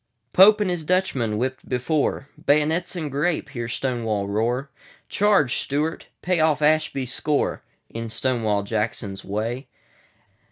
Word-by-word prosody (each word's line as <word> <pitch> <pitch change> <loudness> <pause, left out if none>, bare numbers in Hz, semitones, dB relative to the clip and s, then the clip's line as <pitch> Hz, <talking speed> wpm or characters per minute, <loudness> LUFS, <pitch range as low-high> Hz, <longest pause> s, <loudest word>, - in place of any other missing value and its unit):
Pope 210 +3 +7
and 205 -3 +1
his 175 -3 -2
Dutchmen!—whipped 130 - -1
before."Bay'nets 150 +5 0
and 155 -5 -4
grape!" 150 +2 0
hear 120 -4 -5
Stonewall 115 -5 -1
roar. 120 +7 -1 0.4
Charge, 200 -11 +3
Stuart! 150 +4 -2 0.2
Pay 180 -1 +1
off 155 -2 +2
Ashby's 150 -4 +1
score, 150 -1 0 0.3
In 115 0 -6
Stonewall 110 -3 0
Jackson's 105 -2 -3
Way. 115 +6 -3
135 Hz, 115 wpm, -23 LUFS, 115-155 Hz, 0.4 s, Pope